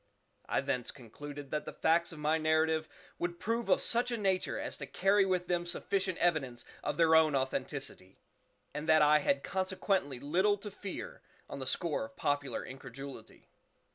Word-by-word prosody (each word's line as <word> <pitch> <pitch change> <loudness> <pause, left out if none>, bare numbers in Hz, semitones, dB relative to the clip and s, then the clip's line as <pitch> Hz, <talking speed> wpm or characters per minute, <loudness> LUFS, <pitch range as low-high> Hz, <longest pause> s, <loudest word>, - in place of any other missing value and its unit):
I - - +2
thence 125 -2 -2
concluded 145 +3 -9
that 150 - -2
the - - -6
facts 170 +2 +2
of 165 - -9
my 155 +2 +1
narrative 160 0 +2 0.3
would 175 0 -3
prove 230 -1 -1
of 185 - +4
such 240 +1 +4
a 235 - -1
nature 190 -3 0
as - - -3
to - - -6
carry 195 +1 +3
with 180 -1 +1
them 175 -1 +1
sufficient 185 +1 -1
evidence 145 -9 0 0.2
of - - -2
their 165 -1 +5
own 160 -2 +5
authenticity, 130 -7 -3 0.6
and 150 +2 -4
that 155 -1 +7
I 150 +1 +6
had 280 - +1
consequently 185 -7 -1
little 185 +9 +2
to 205 +1 -8
fear 195 -1 -7 0.3
on 140 - -7
the 130 - -4
score 170 - 0
of 280 0 -14
popular 145 - -1
incredulity. 135 +1 -10
160 Hz, 170 wpm, -32 LUFS, 145-190 Hz, 0.6 s, that